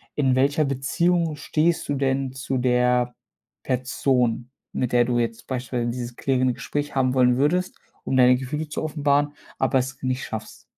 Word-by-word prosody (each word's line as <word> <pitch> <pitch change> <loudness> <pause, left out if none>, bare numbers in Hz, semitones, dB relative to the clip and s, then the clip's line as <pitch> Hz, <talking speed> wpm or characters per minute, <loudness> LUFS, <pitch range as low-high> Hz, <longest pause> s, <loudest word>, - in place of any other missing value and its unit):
„In 135 -3 +2
welcher 140 +3 +2
Beziehung 165 +5 0
stehst 155 +3 0
du 145 - +1
denn 135 -1 0
zu 135 0 -3
der 125 0 +2 0.5
Person, 125 -1 0 0.2
mit 125 - -1
der 120 0 +5
du 120 0 0
jetzt 115 0 -3
beispielsweise 125 -2 -2
dieses 120 0 -6
klärende 130 -2 +1
Gespräch 145 +3 -4
haben 130 -1 +2
wollen 125 -1 +4
würdest, 180 +6 +1 0.3
um 130 - -2
deine 125 0 +6
Gefühle 150 +4 -4
zu 150 - -4
offenbaren, 145 -1 +1 0.2
aber 135 - +2
es 130 +1 -4
nicht 130 0 -1
schaffst?” 110 -1 -7
130 Hz, 160 wpm, -24 LUFS, 125-145 Hz, 0.5 s, deine